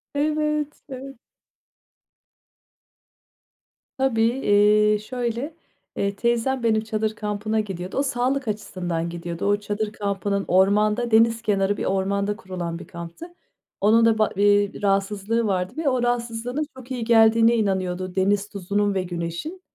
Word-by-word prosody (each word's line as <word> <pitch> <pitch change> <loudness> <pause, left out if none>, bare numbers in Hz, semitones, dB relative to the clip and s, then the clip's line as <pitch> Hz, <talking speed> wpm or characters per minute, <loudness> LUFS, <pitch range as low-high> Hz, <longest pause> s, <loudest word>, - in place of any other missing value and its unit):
Evet, 300 0 0
evet. 270 -1 -9 2.8
Tabii. 265 -4 +1
Eee, 210 -3 +3
şöyle, 245 +5 -4 0.4
eee, 200 0 -1
teyzem 240 +3 0
benim 220 -1 +2
çadır 220 0 -2
kampına 210 +1 -2
gidiyordu, 190 -3 -4
o 275 - +2
sağlık 265 0 -1
açısından 175 -5 -3
gidiyordu. 170 0 -5
O 205 0 +3
çadır 210 +1 -3
kampının 200 -1 -2
ormanda, 210 +5 +3
deniz 225 +1 +4
kenarı 205 -2 +1
bir - - -3
ormanda 200 +2 0
kurulan 180 -5 -5
bir - - -11
kamptı. 170 - -8 0.6
Onun 225 +3 +5
da 225 -1 +4
ba 215 -1 +3
eee, 205 +1 +2
rahatsızlığı 205 +3 0
vardı 185 -2 -1
ve 315 -3 +1
o 255 -2 0
rahatsızlığına 240 +2 -2 0.2
çok 260 0 -12
iyi 250 -3 -2
geldiğine 225 0 +5
inanıyordu 185 -4 -1
deniz 200 +2 +1
tuzunun 200 +1 -1
ve 190 -1 0
güneşin. 175 - -5
210 Hz, 130 wpm, -23 LUFS, 195-235 Hz, 2.8 s, Onun